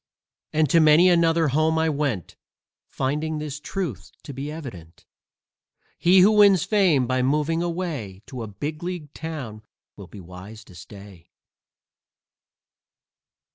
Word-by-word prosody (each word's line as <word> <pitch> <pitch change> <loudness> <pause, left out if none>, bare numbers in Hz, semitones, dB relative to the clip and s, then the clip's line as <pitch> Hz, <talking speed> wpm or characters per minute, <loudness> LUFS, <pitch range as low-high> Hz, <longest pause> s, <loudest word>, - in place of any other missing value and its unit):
And 155 0 +2
to 165 - +5
many 155 +3 +6
another 165 -2 +3
home 155 +3 +1
I 160 0 +1
went, 140 - -2 0.5
Finding 150 +4 -2
this 150 -1 -5
truth 135 - -5
to 140 - -8
be 140 +3 -6
evident: 100 - -10 0.9
He 180 +2 +5
who 200 +4 +6
wins 200 -5 +5
fame 185 - +2
by 130 +1 0
moving 150 +5 0
away 160 - -4
To 130 -2 -8
a 110 - -5
big 145 +10 -6
league 175 -5 -6
town 140 -10 -7 0.3
will 100 -3 -11
be 100 - -12
wise 95 +5 -11
to 95 - -17
stay! 95 -1 -13
150 Hz, 135 wpm, -23 LUFS, 110-165 Hz, 0.9 s, many